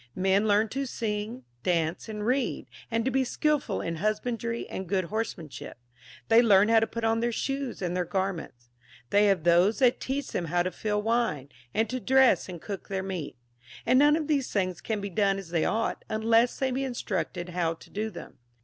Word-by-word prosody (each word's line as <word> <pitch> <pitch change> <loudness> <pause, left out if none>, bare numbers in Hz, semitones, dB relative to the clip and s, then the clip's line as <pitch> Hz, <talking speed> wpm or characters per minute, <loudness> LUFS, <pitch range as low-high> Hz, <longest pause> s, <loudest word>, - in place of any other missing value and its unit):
Men 195 +3 +2
learn 210 +2 +3
to 270 +4 -3
sing, 220 +1 -3 0.2
dance, 170 +2 -1
and 210 -1 -4
read, 255 +2 0 0.2
and 230 0 0
to 265 - +1
be 265 +1 +2
skilful 285 -4 0
in 165 -1 -3
husbandry 230 +4 -2
and 190 -2 -6
good 190 -2 +1
horsemanship; 170 - -5 0.5
they 225 +1 +7
learn 205 -2 +5
how 225 0 +6
to 225 - 0
put 230 +1 -5
on 225 0 +2
their 235 +1 0
shoes 270 -2 -3
and 175 0 -1
tlieir 180 -2 -1
garments; 170 -11 -3 0.4
they 205 +1 +5
have 195 -5 +2
those 175 +5 +4
that 255 -2 +3
teach 275 +1 -3
them 175 - -2
how 175 +2 +1
to 185 - -2
fill 210 +1 -2
wine, 225 - 0 0.2
and 220 - +1
to 255 - -2
dress 265 -4 +4
and 175 -3 -8
cook 200 -3 -6
their 190 -1 -2
meat; 180 -9 -5 0.5
and 255 - +5
none 295 +1 +6
of 315 -1 -1
these 285 -4 0
things 185 -4 -1
can 215 -2 -2
be 200 - -4
done 195 +1 +2
as 190 -4 -8
they 165 -2 +1
ought, 225 +1 -1
unless 225 +2 +2
they 265 -1 0
be 265 +2 -1
instructed 190 -8 -3
how 170 -2 -1
to - - -17
do 215 +2 -2
them. 185 - -11
210 Hz, 205 wpm, -28 LUFS, 185-235 Hz, 0.5 s, they